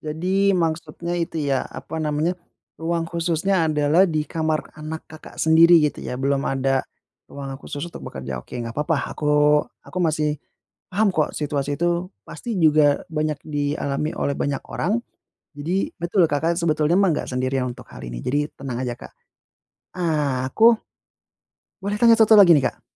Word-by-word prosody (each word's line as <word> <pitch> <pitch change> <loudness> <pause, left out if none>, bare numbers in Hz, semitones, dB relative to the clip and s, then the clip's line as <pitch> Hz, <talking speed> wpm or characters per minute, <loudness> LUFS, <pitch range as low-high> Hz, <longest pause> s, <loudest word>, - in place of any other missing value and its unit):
Jadi 185 +6 +1
maksudnya 165 0 -2
itu 165 -1 -3
ya, 135 - +1
apa 160 - -6
namanya? 155 +2 0 0.5
Ruang 165 0 -1
khususnya 170 +1 0
adalah 150 +4 +3
di 155 -2 -1
kamar 155 -1 -2
anak 155 +1 -6
Kakak 155 - -12
sendiri 165 +2 +7
gitu 150 - -1
ya 125 - -5
belum 140 +1 0
ada 135 0 +1 0.5
ruangan 135 -1 -7
khusus 145 +2 -6
untuk - - -10
bekerja. 65 -1 -6
Oke. - - -9
Enggak 115 -1 -5
papa, 150 +2 +1 0.2
aku 150 0 +3 0.2
aku 185 - -6
masih, 155 -3 0 0.5
paham 205 +3 +2
kok 155 - +1
situasi 145 -1 -2
tuh 175 +1 0 0.2
pasti 235 -4 -5
juga 150 -2 +4
banyak 155 -1 -1
dialami 145 0 -2
oleh 140 - 0
banyak 140 -1 -1
orang. 200 +8 0 0.6
Jadi, 175 +7 -1
betul 175 +1 +2
Kakak 155 +3 +1
sebetulnya 155 0 +2
mah 195 -3 +4
enggak - - -4
sendirian 130 0 -1
untuk - - -13
hal - - -10
ini. - - -6
Jadi 145 +3 0
tenang 130 -2 -4
aja 125 - -2
Kak. - - -12 0.8
Ah, 150 -7 0
aku, 225 - +6 1.1
boleh 200 +1 -2
tanya 230 -1 +7
1 220 0 +6
lagi 180 -4 +8
nih, 135 - +1
Kak? - - -29
155 Hz, 160 wpm, -22 LUFS, 145-170 Hz, 1.1 s, lagi